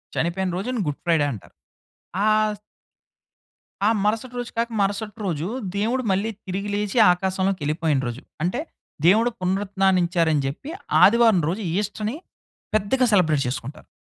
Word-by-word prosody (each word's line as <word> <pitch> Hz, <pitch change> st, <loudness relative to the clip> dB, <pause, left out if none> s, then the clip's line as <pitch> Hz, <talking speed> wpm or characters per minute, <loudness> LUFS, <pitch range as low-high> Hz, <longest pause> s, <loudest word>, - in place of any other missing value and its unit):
చనిపోయిన 180 Hz, +3 st, 0 dB
రోజుని 240 Hz, +5 st, -2 dB
గుడ్‌ఫ్రైడే 155 Hz, +1 st, +1 dB
అంటారు. 105 Hz, -, -10 dB, 0.7 s
ఆస్... 215 Hz, -1 st, +2 dB, 1.3 s
ఆ -, -, +5 dB, 0.2 s
మరుసటి 225 Hz, +4 st, -1 dB
రోజు 245 Hz, -, -5 dB
కాక 230 Hz, +1 st, 0 dB
మరుసటి 205 Hz, +1 st, -1 dB
రోజు, 165 Hz, -4 st, -2 dB, 0.3 s
దేవుడు 230 Hz, +6 st, 0 dB
మళ్ళీ 200 Hz, +4 st, 0 dB, 0.2 s
తిరిగి 195 Hz, +2 st, -3 dB
లేచి, 210 Hz, +3 st, -2 dB
ఆకాశంలోకెల్లిపోయిన 180 Hz, -5 st, 0 dB
రోజు. 120 Hz, +3 st, -5 dB, 0.2 s
అంటే, 180 Hz, -, 0 dB, 0.5 s
దేవుడు 220 Hz, +7 st, +5 dB
పునరుత్థానించారని 185 Hz, -4 st, +1 dB
చెప్పి, 155 Hz, -, -6 dB, 0.3 s
ఆదివారం 225 Hz, -2 st, +6 dB
రోజు 200 Hz, +5 st, -3 dB, 0.2 s
ఈస్టర్‌ని 210 Hz, +3 st, -2 dB, 0.6 s
పెద్దగా 215 Hz, +5 st, +2 dB
సెలబ్రేట్ 160 Hz, -7 st, +3 dB
చేసుకుంటారు. 130 Hz, +3 st, -6 dB
195 Hz, 115 wpm, -23 LUFS, 170-215 Hz, 1.3 s, ఆదివారం